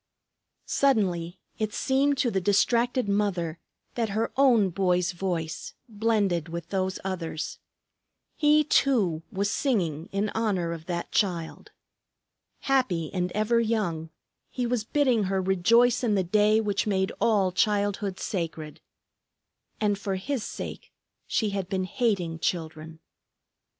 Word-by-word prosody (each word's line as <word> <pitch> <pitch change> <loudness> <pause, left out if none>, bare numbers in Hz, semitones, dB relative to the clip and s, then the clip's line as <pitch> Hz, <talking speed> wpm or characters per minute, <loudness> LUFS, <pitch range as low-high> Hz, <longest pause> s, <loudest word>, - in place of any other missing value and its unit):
Suddenly 190 -10 +1 0.2
it 215 -1 -2
seemed 275 +1 +2
to 245 -3 +1
the 190 - 0
distracted 235 +5 +2
mother 185 -5 -1 0.3
that 230 -3 -1
her 225 - 0
own 235 -8 +4
boy's 180 -1 +1
voice 175 -3 -4
blended 205 -7 0
with 170 +1 -6
those 190 -1 -1
others. 170 -4 -4 0.8
He 300 0 +4
too 215 - +2
was 200 +1 -1
singing 175 - -1
in 200 +2 0
honor 200 -7 -1
of 165 -1 -9
that 170 -1 -3
Child. 175 -6 -1 0.9
Happy 230 - 0
and 180 -1 -1
ever 215 +3 +2
young, 205 -9 -1 0.4
he 250 - -2
was 240 -2 0
bidding 245 -4 +2
her 190 0 0
rejoice 225 +7 +3
in 220 -4 +2
the 190 - +2
day 210 +4 +3
which 210 -1 -1
made 190 -2 +1
all 200 -5 +3
childhood 205 0 0
sacred. 165 -5 -4 1.0
And 205 -2 +1
for 195 -1 -2
his 245 +5 -3
sake - - -7 0.4
she 215 -3 0
had 195 -2 -3
been 190 -1 -1
hating 185 -6 -1
children! 160 -1 -4
200 Hz, 130 wpm, -27 LUFS, 175-225 Hz, 1.0 s, own